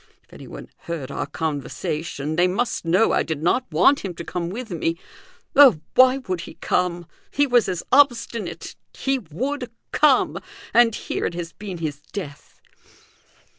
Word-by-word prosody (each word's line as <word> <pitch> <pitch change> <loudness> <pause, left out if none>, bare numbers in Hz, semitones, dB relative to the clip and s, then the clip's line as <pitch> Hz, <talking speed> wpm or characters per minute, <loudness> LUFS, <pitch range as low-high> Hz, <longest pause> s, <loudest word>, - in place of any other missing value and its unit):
If - - -23
anyone - - -10 0.2
heard 155 -5 -4
our - - -3
conversation, 155 0 -3
they 175 +2 +4
must 225 +2 -1
know 185 +7 +3
I - - +2
did 155 -2 -4
not 210 +6 +1
want 185 - +4
him 185 -3 -6
to 170 - -7
come 170 0 -4
with 225 +3 -6
me. 165 0 -1 0.6
Oh! 270 - +8
why 255 +1 +6
would 185 -10 -4
he - - -10
come? 175 -1 -1 0.2
He 285 - +2
was 245 -6 +3
as 180 -2 -3
obstinate 245 -5 +1 0.2
he 270 0 0
would 250 - -4 0.2
come 285 -3 +3 0.3
and 230 -1 +5
here - - -3
it 170 - -6
has 170 -1 -5
been 195 -4 -7
his 150 -3 -4
death!" 155 -9 -8
180 Hz, 160 wpm, -23 LUFS, 165-245 Hz, 0.6 s, Oh